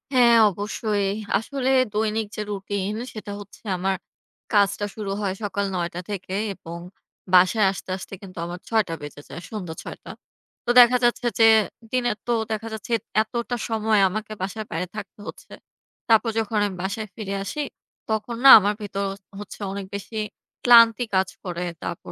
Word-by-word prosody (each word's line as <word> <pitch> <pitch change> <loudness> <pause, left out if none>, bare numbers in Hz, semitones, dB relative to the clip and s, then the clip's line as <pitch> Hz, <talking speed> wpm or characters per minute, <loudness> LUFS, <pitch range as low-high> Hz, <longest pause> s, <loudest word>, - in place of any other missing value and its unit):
হ্যাঁ, 235 -2 +6
অবশ্যই। 205 +1 -2 0.3
আসলে 260 +4 -2 0.2
দৈনিক 215 0 0
যে - - -3
রুটিন, 200 0 -3 0.2
সেটা 210 -2 -7
হচ্ছে 200 -1 -13 0.2
আমার 190 +1 0 0.6
কাজটা 205 0 +3
শুরু 205 -3 -4
হয় 190 -2 -1
সকাল 200 0 -1
৯ঃ০০ 175 -1 -1
টা - - -3
থেকে 190 -1 -5 0.2
এবং 170 -1 -9 0.6
বাসায় 185 +3 +6
আসতে, 190 - -9
আসতে 190 - -10
কিন্তু 185 -2 -12
আমার 175 +1 -6
৬ঃ০০ 220 -2 +3
টা - - -2
বেজে 145 0 -8
যায়। - - -7
সন্ধ্যা 185 -7 -5
৬ঃ০০ - - -7
টা। - - -8 0.5
তো - - -4
দেখা 245 +1 +8
যাচ্ছে, 240 +1 +2
যে 225 - +7 0.5
দিনের 245 -4 0
তো 240 - +2 0.2
দেখা 220 +1 -3
যাচ্ছে, 220 +2 -5 0.3
এতটা 235 +2 -3
সময় 220 -1 +2
আমাকে 215 +2 -5
বাসার 200 +3 -4
বাইরে 175 +2 -2
থাকতে 210 -1 -8
হচ্ছে। - - -10 0.6
তারপর 225 +1 +5
যখন 220 0 -1
আমি 195 - -3
বাসায় 205 +3 -3
ফিরে 200 -3 -5
আসি, 295 +10 -4 0.5
তখন 220 +2 -1
না - - +11
আমার 205 +1 +1
ভেতর 200 -1 -3 0.3
হ - - -10
হচ্ছে, 205 - -9
অনেক 200 0 -5
বেশি 200 +3 -7 0.5
ক্লান্তি 230 -1 +7
কাজ 190 0 +2
করে। 180 -1 -4 0.2
তারপর - - -6
205 Hz, 170 wpm, -24 LUFS, 190-225 Hz, 0.6 s, না